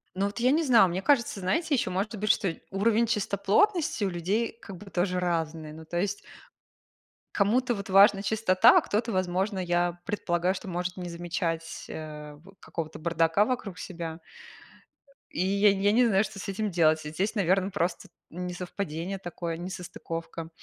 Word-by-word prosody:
Ну, 195 Hz, +1 st, 0 dB
вот 205 Hz, -, -6 dB
я 250 Hz, +2 st, +3 dB
не 320 Hz, +2 st, +3 dB
знаю, 235 Hz, -8 st, +6 dB
мне 185 Hz, +3 st, -2 dB
кажется, 235 Hz, -6 st, +2 dB
знаете, 305 Hz, -, 0 dB
ещё 190 Hz, -6 st, -1 dB
может 200 Hz, +5 st, -2 dB
быть, 210 Hz, +1 st, +2 dB
что 175 Hz, -4 st, 0 dB, 0.2 s
уровень 220 Hz, +4 st, +2 dB
чистоплотности 210 Hz, -, +1 dB
у 195 Hz, -, +1 dB
людей 200 Hz, +7 st, -1 dB
как 190 Hz, -3 st, -9 dB
бы 200 Hz, +2 st, -12 dB
тоже 180 Hz, 0 st, 0 dB
разный. 160 Hz, -3 st, -2 dB
Ну, 160 Hz, 0 st, -11 dB
то 175 Hz, +2 st, -3 dB
есть 200 Hz, +1 st, 0 dB, 1.2 s
кому-то, 240 Hz, +4 st, +2 dB
вот, 200 Hz, -1 st, -7 dB
важна 195 Hz, +1 st, +6 dB
чистота, 220 Hz, +1 st, +5 dB
а -, -, +6 dB
кто-то, 225 Hz, +3 st, -1 dB
возможно, 185 Hz, +2 st, 0 dB
я 175 Hz, -1 st, 0 dB
предполагаю, 185 Hz, -2 st, 0 dB
что 195 Hz, -, -8 dB
может 180 Hz, +1 st, -3 dB
не 180 Hz, -1 st, -5 dB
замечать, 170 Hz, -1 st, -3 dB
э, 150 Hz, -1 st, -8 dB
вот, 195 Hz, +6 st, -18 dB
какого-то 160 Hz, -2 st, -6 dB
бардака 165 Hz, +4 st, +2 dB
вокруг 215 Hz, -7 st, -3 dB
себя. 165 Hz, -3 st, -6 dB, 1.1 s
И 175 Hz, -, -1 dB
я 200 Hz, +1 st, +4 dB
н 195 Hz, -, -2 dB
я 205 Hz, +1 st, +3 dB
не 245 Hz, +2 st, +4 dB
знаю, 195 Hz, -1 st, +3 dB
что 210 Hz, -2 st, -7 dB
с -, -, -6 dB
этим 200 Hz, +1 st, -2 dB
делать. 160 Hz, -2 st, +3 dB
Здесь, 185 Hz, +9 st, -2 dB
наверное, 190 Hz, 0 st, +2 dB
просто 180 Hz, -3 st, -2 dB, 0.2 s
несовпадение 180 Hz, 0 st, -5 dB
такое, 170 Hz, -2 st, -5 dB
несостыковка 170 Hz, -2 st, -6 dB
185 Hz, 170 wpm, -28 LUFS, 170-205 Hz, 1.2 s, знаю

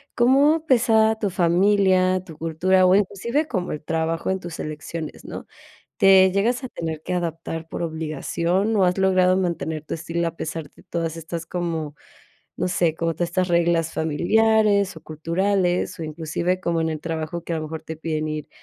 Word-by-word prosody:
¿cómo 280 Hz, +6 st, +4 dB
pesa, 225 Hz, -5 st, +4 dB
tu 205 Hz, -, +1 dB
familia, 185 Hz, +1 st, +3 dB
tu 160 Hz, -, -11 dB
cultura, 180 Hz, +4 st, +2 dB
o 185 Hz, -, +5 dB
inclusive 220 Hz, +9 st, 0 dB
como 185 Hz, -, -2 dB
el 150 Hz, -, -7 dB
trabajo 165 Hz, +1 st, -1 dB
en 190 Hz, -, -1 dB
tus 175 Hz, -2 st, -8 dB
elecciones, 155 Hz, +1 st, -6 dB
no? -, -, -7 dB, 0.5 s
¿Te 190 Hz, -1 st, +6 dB
llegas 230 Hz, +7 st, +1 dB
a -, -, -4 dB
tener 160 Hz, -7 st, -5 dB
que -, -, -4 dB
adaptar 165 Hz, -1 st, -4 dB
por -, -, -5 dB
obligación, 170 Hz, +5 st, -1 dB
o 195 Hz, -, +4 dB
has 180 Hz, +1 st, +1 dB
logrado 185 Hz, -1 st, +4 dB
mantener 165 Hz, -4 st, -2 dB
tu -, -, -4 dB
estilo? 170 Hz, +1 st, -2 dB
A 165 Hz, -, -10 dB
pesar 160 Hz, -1 st, -5 dB
de -, -, -20 dB
todas 165 Hz, -1 st, -3 dB
estas, 165 Hz, +1 st, -6 dB
como, 165 Hz, -4 st, -3 dB, 0.6 s
no 180 Hz, -, -1 dB
sé, 175 Hz, -3 st, +1 dB
como 165 Hz, 0 st, -1 dB
todas 175 Hz, +1 st, -2 dB
estas 185 Hz, +1 st, 0 dB
reglas 170 Hz, -1 st, +2 dB
familiares, 205 Hz, +5 st, +2 dB
o -, -, -9 dB
culturales, 180 Hz, +3 st, 0 dB
o -, -, -3 dB
inclusive, 165 Hz, +4 st, -2 dB
como 170 Hz, -2 st, 0 dB
en 160 Hz, -, 0 dB
el 155 Hz, -1 st, -4 dB
trabajo, 165 Hz, +1 st, -4 dB
que 170 Hz, -, -3 dB
a -, -, -1 dB
lo -, -, -4 dB
mejor 160 Hz, +1 st, -6 dB
te 160 Hz, 0 st, -7 dB
piden 155 Hz, -1 st, -3 dB
ir 155 Hz, -1 st, -4 dB
170 Hz, 185 wpm, -23 LUFS, 160-190 Hz, 0.6 s, Te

